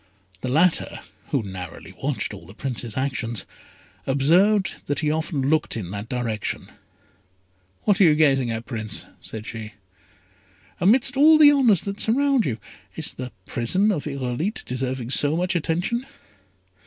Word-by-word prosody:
The 125 Hz, -, -4 dB
latter, 160 Hz, +6 st, +2 dB, 0.3 s
who 135 Hz, -6 st, 0 dB
narrowly 90 Hz, -4 st, -8 dB
watched -, -, -2 dB
all -, -, -11 dB
the 100 Hz, -, -13 dB
Prince's 120 Hz, -3 st, -4 dB
actions, 125 Hz, -6 st, -2 dB, 0.6 s
observed 180 Hz, +9 st, +3 dB
that 145 Hz, +1 st, 0 dB
he 150 Hz, -1 st, +1 dB
often 155 Hz, -3 st, -1 dB
looked 155 Hz, -4 st, +1 dB
in 95 Hz, -5 st, -5 dB
that 105 Hz, +2 st, -6 dB
direction. 115 Hz, -4 st, -3 dB, 1.1 s
"What 205 Hz, -2 st, +3 dB
are -, -, +8 dB
you 155 Hz, -3 st, +5 dB
gazing 135 Hz, -5 st, +3 dB
at, 115 Hz, 0 st, -3 dB
Prince?" 110 Hz, -3 st, -4 dB
said 110 Hz, -1 st, -7 dB
she. 110 Hz, -1 st, -7 dB, 1.1 s
"Amidst 245 Hz, +7 st, +3 dB
all 310 Hz, +3 st, +7 dB
the 300 Hz, -1 st, +9 dB
honours 245 Hz, -, +4 dB
that 200 Hz, 0 st, -5 dB
surround 270 Hz, +1 st, +2 dB
you, 115 Hz, -4 st, -2 dB, 0.4 s
is -, -, -3 dB
the 125 Hz, -1 st, -6 dB
prison 185 Hz, -, +1 dB
of 150 Hz, -7 st, -3 dB
Irolite 140 Hz, -, -3 dB
deserving 130 Hz, -1 st, -3 dB
so 145 Hz, +3 st, +4 dB
much 180 Hz, 0 st, 0 dB
attention?" 175 Hz, -, -1 dB
140 Hz, 145 wpm, -23 LUFS, 120-195 Hz, 1.1 s, the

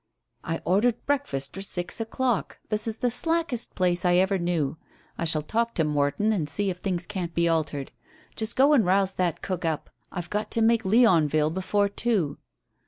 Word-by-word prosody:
"I 165 Hz, 0 st, -3 dB
ordered 215 Hz, +7 st, +1 dB
breakfast 255 Hz, -, -1 dB
for 195 Hz, -, -6 dB
six 180 Hz, +1 st, -1 dB
o'clock. 240 Hz, +1 st, -1 dB
This 215 Hz, +1 st, +1 dB
is 220 Hz, -1 st, -3 dB
the 245 Hz, +1 st, 0 dB
slackest 325 Hz, -3 st, -1 dB
place 180 Hz, -1 st, +1 dB
I 175 Hz, -1 st, +3 dB
ever 190 Hz, +1 st, +2 dB
knew. 165 Hz, -4 st, -1 dB, 0.4 s
I 170 Hz, -, -3 dB
shall 155 Hz, -2 st, +1 dB
talk 230 Hz, +7 st, -1 dB
to 160 Hz, -, +2 dB
Morton 150 Hz, +8 st, +1 dB
and 160 Hz, -8 st, -1 dB
see 200 Hz, +5 st, +1 dB
if 180 Hz, -, -8 dB
things 180 Hz, -2 st, -2 dB
can't 180 Hz, -4 st, -5 dB
be 170 Hz, 0 st, +2 dB
altered. 155 Hz, -4 st, -1 dB, 0.4 s
Just 220 Hz, +1 st, -2 dB
go 280 Hz, +3 st, +5 dB
and 260 Hz, -7 st, +5 dB
rouse 190 Hz, +1 st, +2 dB
that 180 Hz, -4 st, -1 dB
cook 185 Hz, -3 st, -3 dB
up. 160 Hz, -2 st, -2 dB, 0.2 s
I've 175 Hz, -2 st, -6 dB
got 210 Hz, +1 st, -2 dB
to 230 Hz, -, +4 dB
make 225 Hz, -1 st, +3 dB
Leonville 165 Hz, -, +4 dB
before 200 Hz, +3 st, 0 dB
two." 200 Hz, -8 st, -1 dB
190 Hz, 185 wpm, -26 LUFS, 165-225 Hz, 0.4 s, go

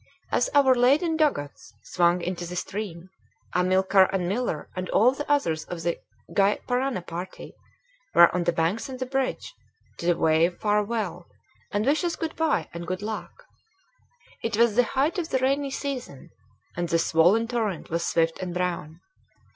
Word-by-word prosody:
As -, -, +2 dB
our 275 Hz, -2 st, +6 dB
laden 280 Hz, +7 st, +3 dB
dugouts 285 Hz, -, -1 dB
swung 175 Hz, 0 st, +1 dB
into 175 Hz, -1 st, -3 dB
the 180 Hz, -, -6 dB
stream, 185 Hz, -1 st, -5 dB, 0.4 s
Amilcar 190 Hz, +1 st, +4 dB
and 185 Hz, -2 st, -1 dB
Miller 200 Hz, -6 st, -2 dB
and 185 Hz, 0 st, -4 dB
all 235 Hz, +4 st, +5 dB
the 290 Hz, +2 st, -4 dB
others 165 Hz, -, +1 dB
of 170 Hz, -2 st, -6 dB
the 170 Hz, 0 st, -1 dB, 0.4 s
Gy 200 Hz, +1 st, +4 dB
Parana 250 Hz, -5 st, -1 dB
party 175 Hz, +2 st, -7 dB, 0.6 s
were 170 Hz, -, +7 dB
on 175 Hz, -1 st, 0 dB
the 175 Hz, -, +3 dB
banks 170 Hz, -, -1 dB
and 260 Hz, -, -6 dB
the 255 Hz, -, -3 dB
bridge 265 Hz, 0 st, -2 dB, 0.5 s
to 175 Hz, +1 st, +2 dB
wave 160 Hz, +3 st, +2 dB
farewell 210 Hz, -4 st, -1 dB, 0.4 s
and 205 Hz, +2 st, 0 dB
wish 295 Hz, +6 st, +2 dB
us 345 Hz, -1 st, -1 dB
good 325 Hz, -1 st, -4 dB
by 315 Hz, -, 0 dB
and 170 Hz, 0 st, -7 dB
good 185 Hz, +2 st, -3 dB
luck. 220 Hz, -, -6 dB, 1.0 s
It 225 Hz, -2 st, -2 dB
was 230 Hz, -2 st, +4 dB
the 245 Hz, 0 st, +4 dB
height 305 Hz, +7 st, +2 dB
of 330 Hz, -, -3 dB
the -, -, +1 dB
rainy 275 Hz, +2 st, +1 dB
season, 265 Hz, -, -6 dB, 0.4 s
and 175 Hz, -1 st, -2 dB
the 170 Hz, -, +3 dB
swollen 175 Hz, +7 st, +3 dB
torrent 220 Hz, -9 st, -3 dB
was 170 Hz, +1 st, -1 dB
swift 165 Hz, -1 st, +1 dB
and 180 Hz, -1 st, -5 dB
brown. 175 Hz, -2 st, -3 dB
195 Hz, 165 wpm, -25 LUFS, 175-255 Hz, 1.0 s, were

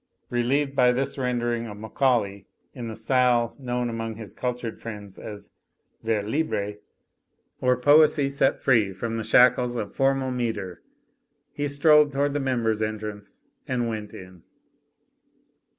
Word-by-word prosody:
Relieved 135 Hz, +4 st, 0 dB
by 125 Hz, -2 st, +5 dB
this 135 Hz, +2 st, -1 dB
rendering 120 Hz, -2 st, -1 dB
of 105 Hz, -1 st, -8 dB
Macaulay 110 Hz, -3 st, 0 dB, 0.3 s
in 120 Hz, -3 st, -6 dB
the 110 Hz, -, -6 dB
style 120 Hz, 0 st, +2 dB
known 125 Hz, -2 st, -2 dB
among 115 Hz, -1 st, -4 dB
his 105 Hz, -4 st, -8 dB
cultured 125 Hz, -2 st, -4 dB
friends 105 Hz, -4 st, -8 dB
as 100 Hz, -1 st, -9 dB, 0.5 s
vers 110 Hz, -2 st, -1 dB
libre, 105 Hz, -6 st, -2 dB, 0.8 s
or 125 Hz, 0 st, +2 dB
poesy 145 Hz, +1 st, +5 dB
set 140 Hz, -1 st, 0 dB
free 110 Hz, -7 st, +3 dB
from 115 Hz, +4 st, -4 dB
the 110 Hz, -, -3 dB
shackles 125 Hz, 0 st, +4 dB
of 105 Hz, -4 st, -5 dB
formal 135 Hz, -1 st, +1 dB
metre, 115 Hz, -7 st, -3 dB, 0.7 s
he 145 Hz, 0 st, -2 dB
strolled 150 Hz, +1 st, +5 dB
toward 140 Hz, +1 st, 0 dB
the 145 Hz, -, 0 dB
members' 120 Hz, -5 st, 0 dB
entrance 105 Hz, -1 st, -5 dB, 0.2 s
and 120 Hz, -2 st, -1 dB
went 105 Hz, -2 st, -5 dB
in. 90 Hz, -2 st, -12 dB
120 Hz, 135 wpm, -25 LUFS, 110-130 Hz, 0.8 s, by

